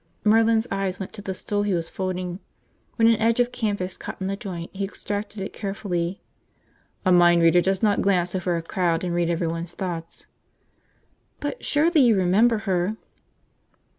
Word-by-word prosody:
Merlin's 225 Hz, +1 st, +4 dB
eyes 195 Hz, -1 st, -2 dB
went 190 Hz, -, -6 dB
to 205 Hz, -, -9 dB
the 190 Hz, -2 st, -4 dB
stool 205 Hz, +2 st, 0 dB
he 205 Hz, -2 st, 0 dB
was 165 Hz, -1 st, -2 dB
folding. 185 Hz, -1 st, -4 dB, 0.6 s
When 225 Hz, -1 st, +4 dB
an 230 Hz, -1 st, +5 dB
edge 230 Hz, +2 st, +2 dB
of 245 Hz, 0 st, +2 dB
canvas 205 Hz, -6 st, -2 dB
caught -, -, -8 dB
in 190 Hz, -, -3 dB
the 195 Hz, +1 st, -1 dB
joint, 185 Hz, -6 st, -7 dB
he 200 Hz, 0 st, -3 dB
extracted 205 Hz, +1 st, -4 dB
it 195 Hz, -, -5 dB
carefully. 195 Hz, -3 st, -3 dB, 0.8 s
"A 185 Hz, -, +4 dB
mind 175 Hz, -1 st, +5 dB
reader 165 Hz, +1 st, +5 dB
does 190 Hz, +2 st, 0 dB
not 205 Hz, -2 st, +3 dB
glance 180 Hz, -3 st, +1 dB
over 180 Hz, -2 st, -1 dB
a 165 Hz, -, -4 dB
crowd 170 Hz, -1 st, 0 dB
and 175 Hz, -1 st, -2 dB
read 170 Hz, -1 st, +1 dB
everyone's 170 Hz, 0 st, -2 dB
thoughts." 170 Hz, -3 st, -5 dB, 1.1 s
"But -, -, -5 dB
surely 310 Hz, +1 st, +3 dB
you 235 Hz, -4 st, +5 dB
remember 200 Hz, +5 st, +3 dB
her!" 190 Hz, +2 st, 0 dB
190 Hz, 170 wpm, -24 LUFS, 175-210 Hz, 1.1 s, an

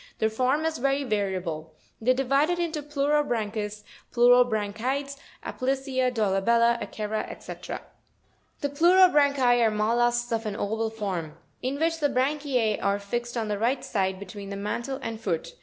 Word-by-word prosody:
— -, -, -30 dB
Their 220 Hz, 0 st, +1 dB
form 260 Hz, +7 st, +1 dB
is 320 Hz, -3 st, -1 dB
very 275 Hz, +2 st, +1 dB
variable. 185 Hz, -, -2 dB, 0.3 s
They 230 Hz, -, 0 dB
are -, -, +7 dB
divided 275 Hz, +6 st, +2 dB
into 335 Hz, -3 st, -2 dB
Pleurobran 285 Hz, -7 st, 0 dB
chus, 210 Hz, -1 st, -4 dB, 0.3 s
Pleurobranchides, 245 Hz, +3 st, +2 dB, 0.3 s
Aplysia, 260 Hz, -1 st, -1 dB
Dolabella, 235 Hz, +2 st, +2 dB
Akera, 215 Hz, 0 st, -3 dB
&c. -, -, -7 dB
37. -, -, -6 dB, 0.8 s
The 285 Hz, -, 0 dB
PLEUROBRANCHI 285 Hz, -6 st, +5 dB
are 225 Hz, -, +5 dB
mol 215 Hz, +2 st, +1 dB
lusks 240 Hz, 0 st, +1 dB
of 225 Hz, -1 st, -1 dB
an 205 Hz, -, -3 dB
oval 220 Hz, +2 st, -1 dB
form; 190 Hz, -8 st, -4 dB, 0.2 s
in 260 Hz, +2 st, -2 dB
which 325 Hz, 0 st, +1 dB
the 290 Hz, -2 st, +2 dB
branchie 265 Hz, -4 st, 0 dB
are 200 Hz, 0 st, +2 dB
fixed 240 Hz, +4 st, -4 dB
on 225 Hz, -2 st, -1 dB
the 205 Hz, -1 st, -2 dB
right 245 Hz, +4 st, 0 dB
side, 190 Hz, -3 st, -1 dB
between 200 Hz, 0 st, -8 dB
the 200 Hz, -, -4 dB
mantle 235 Hz, +7 st, -3 dB
and 225 Hz, -1 st, -5 dB
foot 170 Hz, -7 st, -2 dB
(fig. -, -, -18 dB
240 Hz, 165 wpm, -26 LUFS, 210-275 Hz, 0.8 s, are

